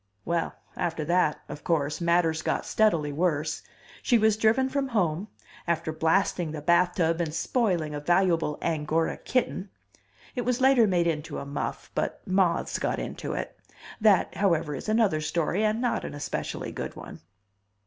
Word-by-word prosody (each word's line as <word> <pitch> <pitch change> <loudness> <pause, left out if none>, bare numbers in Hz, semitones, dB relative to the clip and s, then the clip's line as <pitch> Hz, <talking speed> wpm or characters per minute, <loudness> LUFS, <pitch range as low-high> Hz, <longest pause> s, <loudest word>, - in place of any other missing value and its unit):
Well, 170 0 -1 0.2
after 165 -3 -2
that, 170 -2 +2
of 145 0 -8
course, 150 -1 0
matters 170 -2 +2
got - - -1
steadily 165 -10 +2
worse. 155 -2 0 0.4
She 240 - +3
was 220 -1 +3
driven 225 +4 +3
from 275 0 -1
home, 190 -5 0 0.4
after 160 -2 -1
blasting 165 0 +1
the 150 - -5
bathtub 170 0 +2
and 160 -3 -2
spoiling 175 -4 0
a 145 - -3
valuable 170 -1 +2
Angora 160 0 0
kitten. 205 -6 -1 0.7
(It 250 - -1
was 250 +1 0
later 260 -4 +5
made 175 -3 +2
into 160 -2 -2
a - - -5
muff, 140 0 -5
but - - -2
moths 185 -2 +1
got - - -1
into - - -4
it. - - -4 0.5
That, 210 -4 +4
however, 165 -6 +1
is 140 - -5
another 215 -8 +2
story, 170 +5 0
and 215 +1 +1
not 245 -1 0
an - - -6
especially 145 - -4
good - - -5
one.) - - -10
170 Hz, 160 wpm, -27 LUFS, 155-210 Hz, 0.7 s, later